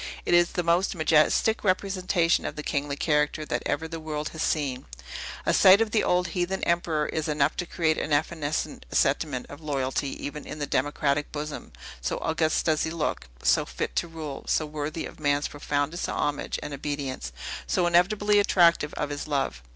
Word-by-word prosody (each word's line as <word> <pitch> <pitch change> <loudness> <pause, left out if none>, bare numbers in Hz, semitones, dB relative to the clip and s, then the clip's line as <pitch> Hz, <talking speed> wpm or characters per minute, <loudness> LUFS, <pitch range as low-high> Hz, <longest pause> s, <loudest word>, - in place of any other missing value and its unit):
It - - +1
is 175 0 +4
the 180 - 0
most 170 +4 +2
majestic 160 +7 +3
representation 185 -3 +1
of - - -4
the 150 - -5
kingly 145 -1 -1
character 150 0 +1
that 120 -4 -2
ever 160 - -1
the 165 0 -6
world 155 -1 -4
has 160 - -7
seen. 135 -5 -1 0.6
A - - +2
sight 190 +1 +8
of 225 -1 +1
the 215 - +2
old 180 0 +2
heathen 180 +3 -2
emperor 170 -3 +1
is 155 0 -2
enough 150 -1 +1
to 175 - -2
create 160 -2 +1
an 155 - -3
evanescent 150 - -1
sentiment 135 -6 +1
of 145 +2 -11
loyalty 140 -2 -1 0.2
even 145 +1 -6
in 155 - -7
a 145 - -1
democratic 145 +1 0
bosom, 150 0 -6 0.3
so - - -1
august 160 -1 0
does 155 -2 +2
he 160 - 0
look, 160 - -2 0.2
so - - +4
fit - - -4
to 170 - +1
rule, 155 -4 -7
so 155 - +1
worthy 150 +1 -4
of - - -10
man's 145 -1 +1
profoundest 145 +2 -2
homage 145 0 -1
and 145 - -5
obedience, 140 - -4 0.4
so 180 - +2
inevitably 205 +4 +3
attractive 170 -6 +4
of 150 -1 -2
his 145 +1 -4
love. 135 - -1
155 Hz, 180 wpm, -26 LUFS, 145-170 Hz, 0.6 s, sight